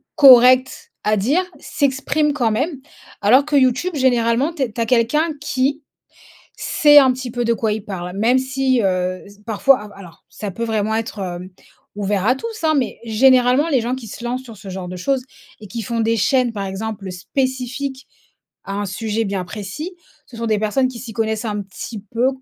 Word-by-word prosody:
correctes 255 -1 +6
à 215 0 +2
dire, 285 - +2 0.2
s'expriment 285 +1 0
quand 245 -6 0
même. 280 +7 -1 0.4
Alors 245 +7 +5
que 295 -2 +2
YouTube, 270 +7 +2
généralement, 255 +3 +2
tu 295 - -7
es 235 - -3
tu 230 - -9
as 230 - +1
quelqu'un 255 +8 +2
qui 280 +1 -1 0.7
sait 295 -1 +5
un 260 -2 +6
petit 255 -1 -6
peu 240 0 -2
de 235 - +2
quoi 220 -2 0
il 215 -1 -6
parle. 180 -3 -6
Même 235 +5 +3
si, 260 -1 0
heu, 185 -1 -1 0.2
parfois, 235 +5 +3
al 210 - -10
alors, 180 -4 -14
ça 205 -1 -6
peut 230 +5 -4
vraiment 220 -1 -1
être, 225 -2 -4
heu, 180 -1 -5 0.4
ouvert 200 -1 -1
à 255 - +4
tous, 445 +3 -7
hein, 315 - +4
mais 260 -5 -1
généralement, 255 +5 +4
les 265 -6 +2
gens 240 +2 -1
qui 260 -3 -8
se 235 - -9
lancent 250 +2 -2
sur 230 -4 -11
ce 195 0 -10
genre 185 -1 -6
de 180 - -6
choses 265 +8 -1 0.4
et 215 - -10
qui 230 +2 -5
font 230 +2 -2
des 225 +1 +1
chaînes, 250 +3 +2
par 200 -2 -4
exemple, 195 0 -5
spécifiques 260 +6 -3 0.6
à 195 - -5
un 205 0 -2
sujet 220 +3 -2
bien 195 -2 -2
précis, 210 - -7 0.3
ce 235 - -13
sont 230 - -3
des 215 -2 +1
personnes 220 +5 +1
qui 255 -2 -8
s'y 230 -1 -8
connaissent 220 +1 -2
un 210 -1 -2
petit 205 +3 -8
peu 240 +3 +2
235 Hz, 200 wpm, -20 LUFS, 210-265 Hz, 0.7 s, correctes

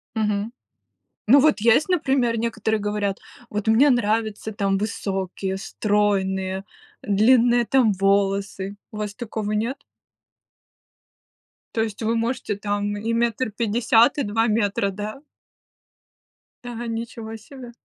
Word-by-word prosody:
Мгм. 210 0 -1 0.8
Ну 270 +6 +7
вот 300 -1 +4
есть, 235 +7 +4
например, 265 -9 +1
некоторые 220 -1 -1
говорят: 205 -1 -2 0.3
"Вот 210 +1 -4
мне 235 +7 +5
нравится 220 -3 0
там 200 -2 0
высокие, 195 -2 -3
стройные, 195 -2 0 0.4
длинные 235 +3 +4
там 240 -4 +3
волосы". 195 0 0 0.2
У 215 - -8
вас 210 -1 -4
такого 220 -3 -4
нет? 230 +6 -2 1.9
То 225 - 0
есть 220 -1 -3
вы 225 +1 +1
можете 230 -2 -1
там 205 0 -2
и 225 +3 -2
метр 235 0 0
пятьдесят, 230 +4 +3
и 285 - 0
2 225 +3 +1
метра, 205 -2 +1
да? 210 +6 -6 1.4
Да, 240 -1 -6
ничего 225 -1 -5
себе! 245 +2 -11
220 Hz, 120 wpm, -23 LUFS, 205-235 Hz, 1.9 s, Ну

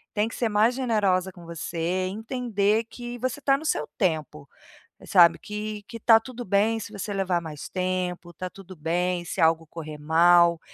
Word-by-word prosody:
tem 210 +1 +2
que 230 - -8
ser 230 -3 -1
mais 215 +4 +3
generosa 200 -7 +1
com 175 -2 -14
você 170 +2 -2
e - - -3
entender 220 -1 0
que 240 0 -7
você 255 +2 -2
tá 275 -1 +3
no 280 - -5
seu 150 - 0
tempo, 155 -5 -1 0.6
sabe, 175 -3 +6
que 210 0 -5
que 230 - -7
tá 225 0 +6
tudo 245 0 -8
bem 205 +4 +2
se 215 - -8
você 205 0 -5
levar 185 -3 0
mais 155 -3 -8
tempo, 180 -2 -3
tá 185 +2 -6
tudo 190 -1 -12
bem 175 +3 -1
se - - -4
algo 165 0 +3
correr 155 -1 -8
mal, 170 +2 +4
185 Hz, 185 wpm, -25 LUFS, 170-220 Hz, 0.6 s, sabe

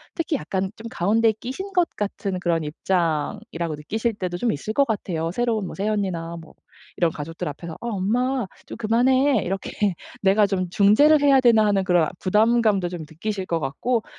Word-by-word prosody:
특히 330 -2 -1
약간 190 -3 -3
좀 230 +1 -9
가운데 220 +5 +2
끼신 265 - -7
것 355 -2 +3
같은 200 -2 -3
그런 170 -2 0
입장이라고 165 0 -2
느끼실 220 +10 -2
때도 180 -3 -3
좀 235 +4 0
있을 180 +9 -4
것 280 - +4
같아요. 170 -8 -2
새로운 225 -2 0
뭐 - - -6
새언니나 190 -5 -2
뭐 160 -1 -14 0.4
이런 170 -2 +2
가족들 160 +2 -6
앞에서 160 +3 -6
'아 235 - -4
엄마 235 +5 0 0.2
좀 - - -8
그만해.' 255 +3 +3
이렇게 195 +2 -4 0.5
'내가 200 +2 +4
좀 185 -2 -1
중재를 215 - +5
해야 275 -2 +6
되나.' 230 -4 +5
하는 200 -2 +2
그런 180 -3 +3
아 - - -5
부담감도 210 -2 +2
좀 175 -2 -6
느끼실 190 +4 -4
것 165 -1 0
같고 220 - -1
200 Hz, 360 characters per minute, -23 LUFS, 175-235 Hz, 0.5 s, 해야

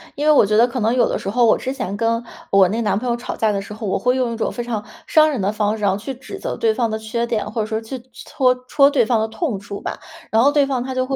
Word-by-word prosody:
因 290 - -2
为 305 - +6
我 300 - +6
觉 210 +1 +1
得 235 +2 +6
可 250 +1 -4
能 225 +1 +1
有 250 - +3
的 - - -1
时 195 - -4
候 240 +3 +3
我 225 - +5
之 260 - -4
前 245 -8 -4
跟 230 +2 0 0.3
我 195 -1 +6
那 225 +4 -1
男 210 -3 +1
朋 250 +4 -3
友 240 - +1
吵 240 +1 -6
架 220 -1 +1
的 200 -1 -2
时 200 - -11
候， 215 +1 -6
我 190 - 0
会 250 +1 +1
用 250 -3 0
一 - - -4
种 225 - -2
非 240 - -4
常 230 -3 -3 0.2
伤 310 0 +5
人 280 -6 -2
的 195 +1 0
方 210 0 0
式 210 - -7
然 200 - +3
后 - - 0
去 220 +7 -6
指 335 +10 -9
责 - - -4
对 450 -1 +2
方 235 - 0
的 220 - -2
缺 230 +2 -3
点， 215 -2 -2
或 220 0 -2
者 215 - -3
说 220 0 -2
去 230 +3 -7
搓 255 -1 +1
戳 280 +1 +5
对 270 -5 +2
方 230 0 +2
的 220 - 0
痛 225 - -3
处 200 0 -7
吧。 - - -5 0.3
然 225 - +4
后 285 - +5
对 290 -1 +3
方 265 -3 -1
他 260 0 -5
就 255 0 0
会 270 +1 -2
235 Hz, 355 characters per minute, -20 LUFS, 215-255 Hz, 0.3 s, 为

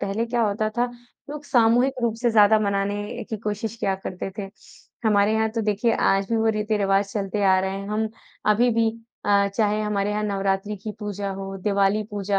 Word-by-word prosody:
पहले 210 +4 -1
क्या 235 0 0
होता 215 +1 0
था, 245 - +4 0.5
लोग 295 0 -7
सामूहिक 245 +1 +3
रूप 230 -2 +1
से 240 - +3
ज़्यादा 215 0 +6
मनाने 205 0 -2
की 220 - -2
कोशिश 210 +1 -4
किया 195 -4 0
करते 185 +1 -4
थे। 195 -2 -4 0.6
हमारे 205 0 +3
यहाँ 220 0 +2
तो 225 +1 -2
देखिए 215 +2 +1
आज 195 0 +2
भी 230 - +2
वो 225 0 +2
रीति-रिवाज़ 205 -2 +1
चलते 205 0 -2
आ 190 -1 +5
रहे 190 0 -1
हैं। 200 - -7
हम 215 +1 -1 0.4
अभी 240 +3 +3
भी 225 -1 +3 0.3
अ, 200 -1 +3
चाहे 210 -1 +1
हमारे 205 -1 0
यहाँ 210 0 -1
नवरात्रि 195 0 -1
की 210 +2 -6
पूजा 205 -1 -4
हो, 195 0 -6
दिवाली 200 +1 +2
पूजा 200 -1 -1
210 Hz, 195 wpm, -24 LUFS, 200-220 Hz, 0.6 s, ज़्यादा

